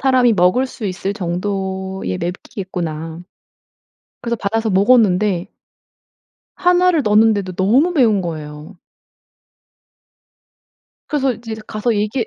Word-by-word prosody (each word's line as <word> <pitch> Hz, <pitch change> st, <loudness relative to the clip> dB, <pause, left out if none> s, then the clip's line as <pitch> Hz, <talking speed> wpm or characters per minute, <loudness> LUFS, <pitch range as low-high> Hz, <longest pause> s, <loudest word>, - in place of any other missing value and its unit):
사람이 255 Hz, -3 st, +4 dB
먹을 190 Hz, +7 st, +3 dB
수 225 Hz, -4 st, -6 dB
있을 190 Hz, +1 st, -3 dB
정도의 190 Hz, -, -3 dB
맵기겠구나.' 170 Hz, -3 st, -5 dB, 1.0 s
그래서 235 Hz, 0 st, -2 dB
받아서 220 Hz, +2 st, -1 dB
먹었는데 200 Hz, -3 st, +3 dB, 1.1 s
1 360 Hz, 0 st, +3 dB
를 320 Hz, -5 st, +1 dB
넣었는데도 210 Hz, -3 st, +3 dB
너무 235 Hz, -, +2 dB
매운 225 Hz, -, +3 dB
거예요. 155 Hz, +1 st, -7 dB, 2.3 s
그래서 275 Hz, -3 st, +1 dB
이제 230 Hz, -2 st, -7 dB
가서 220 Hz, +2 st, -1 dB
얘기 215 Hz, +3 st, -1 dB
205 Hz, 235 characters per minute, -18 LUFS, 185-235 Hz, 2.3 s, 사람이